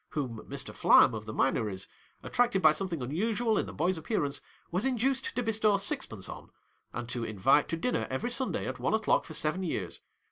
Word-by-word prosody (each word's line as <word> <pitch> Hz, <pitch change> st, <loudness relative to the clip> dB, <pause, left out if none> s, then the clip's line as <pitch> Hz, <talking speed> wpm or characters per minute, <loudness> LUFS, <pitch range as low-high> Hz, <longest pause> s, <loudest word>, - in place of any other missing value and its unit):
Whom 125 Hz, -7 st, -3 dB
Mr. -, -, -5 dB
Flam -, -, +6 dB
of 110 Hz, -1 st, -5 dB
the -, -, -4 dB
Minories 105 Hz, -5 st, 0 dB, 0.2 s
— -, -, -36 dB
attracted 240 Hz, -5 st, +2 dB
by 155 Hz, -4 st, +7 dB
something 165 Hz, -3 st, -3 dB
unusual 215 Hz, -, 0 dB
in -, -, -2 dB
the -, -, -6 dB
boy's 175 Hz, +3 st, 0 dB
appearance 145 Hz, -6 st, -1 dB
— -, -, -33 dB
was 180 Hz, +4 st, 0 dB
induced 265 Hz, +1 st, 0 dB
to 245 Hz, -, 0 dB
bestow 215 Hz, -2 st, +2 dB
sixpence 195 Hz, -, -3 dB
on, -, -, -9 dB, 0.4 s
and 120 Hz, -1 st, -5 dB
to 120 Hz, -1 st, -2 dB
invite 115 Hz, +7 st, +3 dB
to 165 Hz, -, -1 dB
dinner 250 Hz, +9 st, -1 dB
every 130 Hz, -, -2 dB
Sunday 260 Hz, +1 st, 0 dB
at 130 Hz, 0 st, -4 dB
one 125 Hz, -, +1 dB
o'clock 220 Hz, -1 st, +2 dB
for 160 Hz, -, -8 dB
seven 155 Hz, +5 st, 0 dB
years. 105 Hz, -, -3 dB
165 Hz, 205 wpm, -30 LUFS, -, 0.4 s, by